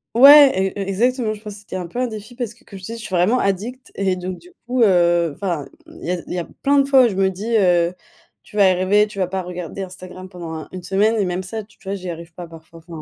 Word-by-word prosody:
ouais 280 +2 +9 0.2
et 200 - -4
heu, - - -2
exactement 235 +2 0
je 210 - -11
pense 210 -2 -8
que 200 - -11
c'était 195 - -7
un 180 -2 -5
peu 205 - -10
un 255 - +1
défi 220 +1 -9
parce 235 -3 -4
que 250 +4 -26
comme 195 - -11
je 185 - -13
te 225 - -6
dis 230 - -6
je 230 - -9
suis 185 - -3
vraiment 205 +9 +3
addict 220 +7 -3
et 190 -2 0
donc 180 0 -5
du 360 - -17 0.2
coup, 250 0 0
heu 175 -4 +3
enfin 175 -6 -3 0.2
il 325 - -14
y 175 - -2
a 180 -2 -2
il - - -5
y 180 - -2
a - - -2 0.2
plein 285 0 +3
de 275 - +5
fois 265 -2 +6
où - - +4
je 190 - -5
me 195 0 +2
dis: 210 +5 -3
«heu, 175 -3 +3 0.5
tu 210 - -11
vas 200 -2 +6
y - - +5
arriver, 190 +3 +3
tu 205 - -13
vas 185 - +1
pas 190 0 -3
regarder 180 +2 -6
Instagram 185 0 -10
pendant 175 -3 -8
un 155 - -7
une 185 -1 -7
semaine» 210 +4 +2
et 205 - +2
même 180 0 -2
ça 220 +4 -5
tu 215 +1 -23
vois 195 0 -4
j'y 185 -2 -7
arrive 170 0 -8
pas 175 0 -8
parfois, 165 0 -14
enfin. 165 -1 -10
190 Hz, 300 wpm, -20 LUFS, 180-220 Hz, 0.5 s, ouais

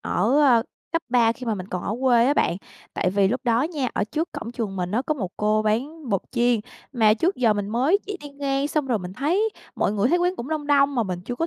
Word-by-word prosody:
ở, 230 +5 0
a, 245 -5 +5 0.3
cấp 330 0 0
3 235 -2 +4
khi 250 0 -9
mà 225 - +1
mình 185 -2 -6
còn 180 - -4
ở 210 - -2
quê 245 -3 +4
á 285 - +3
bạn. 175 - +1 0.4
Tại 180 - 0
vì 195 0 +3
lúc 250 +4 -1
đó 235 0 +2
nha, 295 -5 -2
ở - - +1
trước 315 +10 -3
cổng 230 - -6
trường 215 -5 -4
mình 180 -1 -2
á 225 +5 0
có 305 - +1
một 190 -10 -4
cô 215 +1 +1
bán 265 +8 -2
bột 195 -4 +1
chiên, 240 -2 +2 0.3
mà 220 -4 +4
trước 340 - 0
giờ 235 -4 +3
mình 205 -1 -3
mới 260 - +2
chỉ 410 - -4
đi 290 - -8
ngang, 280 0 -1
xong 300 -2 -1
rồi 240 -4 +1
mình 180 -1 -7
thấy 340 - +1 0.3
mọi - - +1
người 210 +2 +1
thấy 350 - +3
quán 355 +1 0
cũng 245 - -6
đông 310 -2 -3
đông 285 -1 +3
mà 240 - +2
mình 180 -4 -4
chưa 245 - -4
có 325 +6 -1
245 Hz, 270 wpm, -24 LUFS, 215-290 Hz, 0.4 s, a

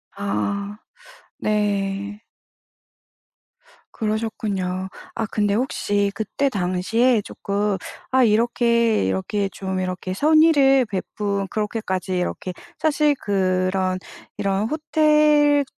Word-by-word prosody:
아. 200 - -2 0.6
네. 205 -1 -1 1.7
그러셨군요. 210 -4 -2 0.3
아 225 - -1
근데 205 -1 0
혹시 205 -4 0
그때 250 +6 -1
당시에 210 +4 +1
쪼끔 200 0 -2 0.3
아 260 0 +4
이렇게 235 - +2
이렇게 95 - -1
좀 190 -1 -4
이렇게 185 0 -3
선의를 290 0 +5
베푼 200 0 -3
그렇게까지 205 -3 -2
이렇게 180 +1 -3 0.3
사실 300 -1 +2
그런 185 -1 0 0.4
이런 200 +2 0
호텔 300 -1 +3
205 Hz, 195 characters per minute, -22 LUFS, 190-240 Hz, 1.7 s, 선의를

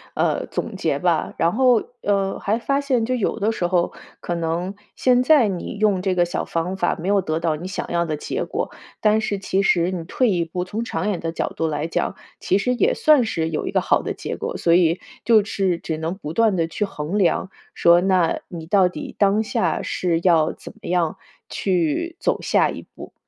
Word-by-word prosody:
呃， - - 0
总 - - -4
结 - - 0
吧。 - - 0
然 170 +1 +2
后， 250 -2 +4 0.2
呃， 195 -1 0
还 210 +3 0
发 275 +4 0
现 255 -5 +1
就 255 - -1
有 240 -5 -1
的 210 +3 +1
时 180 -6 -1
候， 175 -1 +1 0.3
可 175 - -4
能 170 +3 -2 0.2
现 250 -1 +3
在 265 -3 +5
你 190 +1 -4
用 205 -3 +2
这 185 -1 0
个 175 -1 +3
小 175 - -3
方 170 +3 -2
法 190 - 0
没 170 - -5
有 200 0 +3
得 155 -2 -2
到 165 -2 0
你 170 +4 -6
想 190 - -4
要 170 0 +1
的 155 -3 -3
结 - - -3
果， - - -3 0.3
但 215 0 +3
是 210 -2 -1
其 195 0 0
实 175 -2 +2
你 180 -3 -4
退 245 +5 +1
一 175 -3 +1
步， 175 +2 -4
从 205 +5 -4
长 230 - -3
远 200 -5 -1
的 165 - -3
角 - - -2
度 165 - 0
来 150 -1 -2
讲， 165 +3 -2 0.2
其 190 - +1
实 250 +5 0
也 425 - +2
算 305 - +5
是 165 -7 -1
有 155 - -3
一 - - -2
个 - - +2
好 - - +2
的 - - -4
结 - - -5
果， - - -4
所 170 - +2
以 170 0 +3 0.2
就 220 -3 +5
是 195 -4 0
只 160 -1 -4
能 165 +3 -3
不 155 -5 -6
断 220 +1 +3
地 165 -2 +1
去 165 - -3
衡 180 0 -3
量 190 0 +1 0.2
说， 170 +1 +5
那 185 -3 +2
你 165 -2 -8
到 190 +2 +4
底 - - -8
当 205 +2 +3
下 175 -6 -1
是 170 -3 0
要 165 -4 +4
怎 - - -11
么 - - -7
样 175 -3 +1 0.3
去 185 - -1
走 - - 0
下 - - +2
一 - - -7
步。 - - -10
185 Hz, 240 characters per minute, -22 LUFS, 170-210 Hz, 0.3 s, 在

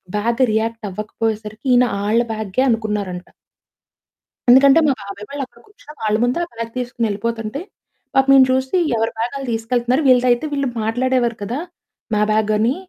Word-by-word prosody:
Bag 230 +4 0
react 225 0 -1
అవ్వకపోయేసరికి 215 +2 -4
ఈయన 245 0 +5 0.2
ఆళ్ల 225 +3 +3
బ్యాగేననుకున్నారంట. 215 -4 -1 1.2
ఎందుకంటే 270 +4 +7
మా 275 - +3
బాబాయ్ 200 +1 -8
వాళ్లు 280 0 -4
అక్కడ - - -23
కూర్చుని, 410 -7 -15
వాళ్ల 215 -1 +1
ముందే 245 +6 +1
ఆ - - -18
బ్యాగ్ 230 0 -5
తీసుకొని 240 -2 -2
ఏళ్లిపోతుంటే, 225 +5 -3 0.5
పాపం 270 0 +4
ఈయన 265 - +8
చూసి, 260 +4 0 0.2
"ఎవరి 225 0 0
బ్యాగ్ 235 +3 -2
ఆళ్లు 270 -1 -6
తీసుకెళ్తున్నారు. 240 +4 0
వీళ్లదైతే 250 +1 +4
వీళ్లు 280 -1 -1 0.2
మాట్లాడే‌వారు 240 +1 0
కదా! 230 +6 -3 0.6
మా 210 - +2
బ్యాగని" 215 +3 +2
230 Hz, 145 wpm, -19 LUFS, 215-255 Hz, 1.2 s, ఈయన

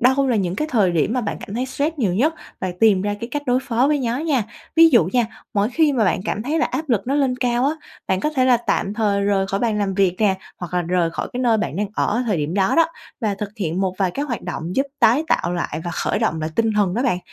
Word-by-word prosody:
đâu 265 +3 +3
là 240 - +2
những 180 -3 -1
cái 305 +7 -2
thời 210 -7 +3
điểm 170 +6 +1
mà 255 - 0
bạn 210 - -3
cảm 200 - -8
thấy 250 +3 -1
stress 290 +4 -2
nhiều 195 -8 +1
nhất, 300 - +2 0.3
bạn 185 -1 -2
tìm 205 -4 +5
ra 205 0 -1
cái 235 - -5
cách 290 +3 -3
đối 250 +1 +3
phó 245 +3 +1
với 295 -1 +2
nhó 240 -2 -1
nha. 295 -6 +1 0.3
Ví 330 0 +8
dụ 240 - +5
nha, 245 -2 +2 0.3
mỗi 205 +1 +2
khi 310 +2 +3
mà 240 -5 +2
bạn 185 - +1
cảm 215 - -2
thấy 300 +7 -1
là - - +3
áp 295 +5 -4
lực 225 -5 +1
nó 270 - 0
lên 270 -3 +1
cao 245 0 +1
á, 290 - +2 0.3
bạn 190 0 0
có 300 - 0
thể 265 -4 +1
là 255 -1 +5
tạm 215 -3 -1
thời 205 -2 +1
rời 195 -1 +1
khỏi 195 +1 -2
bàn 225 -3 0
làm 200 -2 -1
việc 190 -2 +2
nè, 205 -3 +3 0.2
hoặc 175 0 -6
là 180 - +1
rời 175 -1 0
khỏi - - -4
cái 250 - -3
nơi 235 -3 +3
bạn 170 - -3
đang 205 +1 0
ở 230 +4 0
thời 205 -6 +1
điểm 150 +3 -2
đó 195 -1 +2
đó 330 -1 +5 0.3
và 210 -3 0
thực 200 0 -5
hiện 180 -3 -2
một 190 -1 0
vài 190 -2 +1
cái 280 +10 -3
hoạt 235 -7 -4
động 170 +3 -5
giúp 275 +1 +2
tái 265 +8 +4
tạo 175 - +1
lại 170 -2 -3
và 175 - -3
khởi - - -1
động 160 - 0
lại 155 +1 -3
tinh 225 -1 +2
thần 200 -3 +1
đó 240 - 0
bạn. 240 -9 +1
220 Hz, 290 wpm, -21 LUFS, 190-255 Hz, 0.3 s, Ví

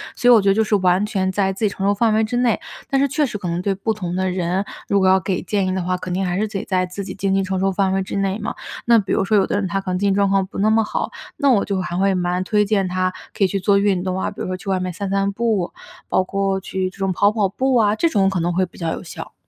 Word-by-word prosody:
所 245 - +2
以 - - +9
我 220 - +6
觉 195 - -1
得 - - +5
就 220 - +3
是 215 - +1
完 185 +1 +2
全 190 -3 -1
在 195 0 +1
自 205 +3 -2
己 205 - +3
承 195 0 -4
受 200 - +3
范 220 +1 +2
围 220 +1 +3
之 240 +3 -2
内， 245 -3 +2 0.3
但 270 - +2
是 280 - +3
确 295 +2 +1
实 225 -6 -4
可 190 -3 -5
能 170 +1 -2
对 195 0 0
不 220 +3 -1
同 180 -4 -4
的 185 0 0
人， 180 +2 -1 0.2
如 200 - +2
果 190 - +3
要 190 0 +5
给 185 0 -2
建 200 -3 0
议 185 - -1
的 190 - -1
话， 180 0 -1
肯 180 0 -5
定 190 +1 0
还 180 0 -1
是 215 - 0
得 200 -2 -4
在 185 -1 +1
自 180 +3 -6
己 - - -6
经 195 0 -1
济 195 - +2
承 190 0 -2
受 195 0 +1
范 190 0 +1
围 195 - +1
之 190 - -5
内 195 +1 -1
嘛。 210 - -4 0.3
那 235 -1 +6
比 195 - -4
如 - - +2
说 210 +1 +3
有 195 - +4
的 - - -2
人 200 -2 -1
他 195 +3 -1
可 185 - -4
能 180 - -1
经 200 -1 +2
济 - - +1
状 200 -1 +2
况 195 -1 +2
不 - - -10
那 215 +2 +3
么 220 0 +3
好， - - -3 0.3
那 285 -2 +2
我 205 -5 +3
就 195 -2 -1
还 175 0 -4
会 195 +1 +2
蛮 180 0 0
推 210 +2 +2
荐 200 -2 +1
他 185 0 -1 0.2
可 200 - +2
以 - - +5
去 195 +2 -2
做 200 +1 +3
运 200 -3 +1
动 185 0 -2
啊， - - -2
比 - - -9
如 - - -3
说 185 - -2
去 195 - -8
外 190 -1 +1
面 185 0 -3
散 200 +2 -4
散 195 0 +1
步， 215 -4 -1 0.3
包 185 - +2
括 195 0 -1
去 190 0 -3
这 200 - -18
种 195 -1 0
跑 200 +3 +3
跑 210 -3 +1
步 260 +5 0
啊， 215 -3 +3
这 335 +8 +2
种 195 -5 +2
可 190 - -1
能 175 +1 0
会 185 +2 +2
比 175 - -18
较 165 -2 -2
有 - - -6
效。 - - -9
195 Hz, 355 characters per minute, -20 LUFS, 185-205 Hz, 0.3 s, 以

